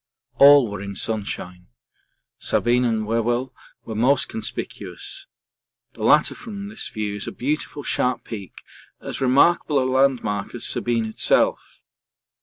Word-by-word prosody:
All 140 -2 +8
were 100 -1 -6
in 100 0 -6
sunshine; 95 -4 -4 0.7
Sabine 125 +1 +1
and 110 -2 0
Whewell 120 +3 -1 0.3
were 110 - -5
most 130 +5 +2
conspicuous 390 - -5 0.7
the - - -12
latter - - +4
from 205 -3 -8
this 215 - -3
view 105 -2 -4
is 105 - -5
a - - -3
beautiful 145 +2 -3
sharp 125 -2 0
peak, 100 -5 -9 0.4
as - - -6
remarkable 145 +4 +3
a 130 - +1
landmark 130 -6 +1
as 120 - -5
Sabine 115 -2 0
itself. 110 - 0
120 Hz, 130 wpm, -22 LUFS, 110-140 Hz, 0.7 s, All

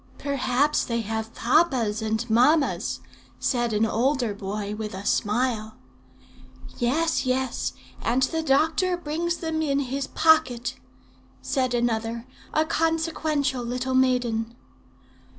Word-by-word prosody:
"'Perhaps 280 +1 +1
they 235 -1 -1
have 220 +1 -4
papas 240 -5 +2
and 220 +2 -1
mammas,' 260 +7 +2 0.4
said 240 -3 0
an 215 +1 +2
older 240 0 +1
boy, 205 +1 -4
with 210 -2 -5
a 195 +2 -7
smile. 220 0 0 1.0
"'Yes, 305 +8 +1
yes; 260 -1 -1 0.3
and 250 +3 +1
the 320 +5 0
doctor 320 +5 +2
brings 340 +1 -2
them 320 -1 -2
in 280 -3 +1
his 275 0 -2
pocket,' 315 -7 +3 0.7
said 255 -3 0
another, 230 -1 -1 0.3
a 310 - +2
consequential 315 -5 0
little 250 +2 -2
maiden. 245 -3 +1
255 Hz, 115 wpm, -25 LUFS, 225-300 Hz, 1.0 s, pocket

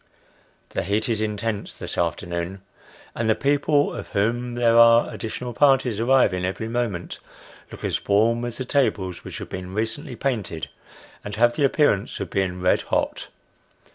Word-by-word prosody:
The - - -1
heat 105 +5 0
is 110 -2 0
intense 105 0 -3
this - - -6
afternoon, 85 +2 -2 0.5
and 115 -1 -1
the 110 - +4
people, 145 +1 +2
of - - -6
whom 120 +4 -1
there 120 -1 +3
are 115 0 +6
additional 120 +2 -5
parties 130 -4 +3
arriving 115 -7 +3
every 95 +4 -2
moment, 115 -7 -3 0.5
look - - -10
as - - -1
warm 115 +4 +3
as 120 -1 -4
the 130 - -4
tables 100 -10 0
which - - -7
have - - -7
been 90 0 -6
recently 115 +6 -3
painted, 110 - -3 0.5
and 105 - -5
have 120 +2 +3
the 145 - +2
appearance 135 -8 +1
of - - -5
being 90 -2 -1
red 90 - +3
hot. - - -2
115 Hz, 160 wpm, -23 LUFS, 95-120 Hz, 0.5 s, are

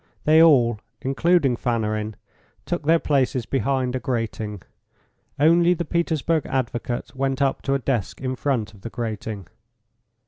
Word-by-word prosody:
They 155 +1 +6
all, 120 -9 +5 0.2
including 135 0 +2
Fanarin, 110 -3 -2 0.5
took 175 -4 -3
their 165 +1 +6
places 135 -5 0
behind 130 -1 0
a - - -1
grating. 110 - -3 0.8
Only 170 +3 +5
the 170 - -3
Petersburg 165 -1 0
advocate 120 -1 -3
went 135 0 -1
up 135 -1 +1
to 135 - 0
a - - +3
desk 125 -6 -2
in 130 -1 -3
front 125 -5 -1
of 100 - -17
the 115 - -6
grating. 110 -4 -5
130 Hz, 140 wpm, -23 LUFS, 115-150 Hz, 0.8 s, They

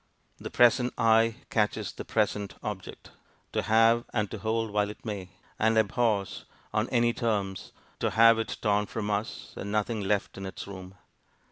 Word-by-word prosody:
The - - -6
present 120 +1 +4
eye 115 0 +4 0.2
catches 105 -2 0
the - - -8
present 105 -3 -1
object - - -7 0.4
to - - +1
have 115 +2 +4
and 105 -3 -1
to - - -5
hold 110 0 -1
while 105 0 +1
it 105 - -11
may; 100 -4 -5 0.3
and 110 +1 +3
abhors, 110 -2 +1 0.3
on 110 +2 0
any 120 -1 +2
terms, 100 -5 -2 0.3
to - - +1
have 115 0 +6
it 115 - -3
torn 105 -1 +2
from 105 -2 -3
us, 105 +2 -4
and 100 - -5
nothing 105 +1 0
left 100 -1 -1
in 95 - -5
its 95 - -7
room. 95 -1 -9
110 Hz, 165 wpm, -28 LUFS, 100-115 Hz, 0.4 s, have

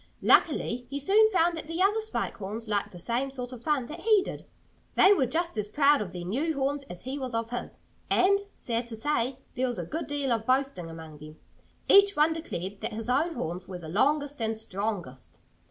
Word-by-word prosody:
Luckily 245 -5 +3
he 280 +1 -3
soon 420 +9 +5
found 345 -4 +2
that 320 - -6
the 330 +2 -4
other 410 +4 +3
Spike 435 0 -3
Horns 215 +3 -5
liked 205 -2 0
the 180 - -11
same 240 +9 -1
sort 250 -2 -6
of 250 -3 -9
fun 285 -1 0
that 310 +7 -8
he 425 0 +4
did. - - -7 0.5
They 390 - +7
were 270 -10 +2
just 335 -2 -1
as 210 - -2
proud 285 +4 +4
of 190 -4 -4
their 175 -1 -6
new 290 - -1
horns 275 +1 -1
as 175 -8 -9
he 265 +3 -4
was 255 -3 -4
of 230 0 -2
his. 245 - -5 0.3
And 395 +2 +4 0.2
(sad 235 0 -3
to 230 - -6
say!) 250 +1 0 0.2
there 255 +1 0
was 245 - -3
a - - -3
good 320 +1 -4
deal 285 -3 0
of 225 -1 -1
boasting 260 -10 0
among 160 -2 -10
them. 155 +1 -11 0.5
Each 400 0 +7
one 305 +2 +4
declared 200 - -5
that - - -3
his 225 +2 -4
own 315 +6 +1
horns 175 +3 -4
were 185 - -6
the 165 -3 -9
longest 285 - +1
and 220 0 -1
strongest. 195 - -5
255 Hz, 220 wpm, -28 LUFS, 215-305 Hz, 0.5 s, They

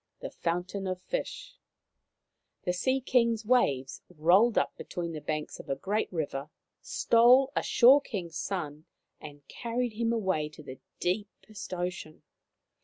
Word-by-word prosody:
THE - - -6
FOUNTAIN 180 +3 -3
OF 185 -1 -3
FISH - - -5 1.0
The 180 - 0
Sea 260 +9 0
King's 235 -3 +2
waves 145 - +1
rolled 180 +8 +4
up - - +1
between 175 -2 -5
the 155 -2 -6
banks 150 +1 -4
of - - -11
a 135 - 0
great 200 +10 -2
river, 150 -4 -3 0.3
stole 250 +4 +4
a - - +2
Shore 265 +4 +6
King's 180 -11 -6
son, 155 -4 -4 0.3
and 145 -2 -12
carried 240 0 -3
him 230 +1 0
away 190 -9 0
to 145 -4 -11 0.2
deepest 205 +2 -4
ocean. 175 -3 -5
185 Hz, 135 wpm, -29 LUFS, 155-230 Hz, 1.0 s, Shore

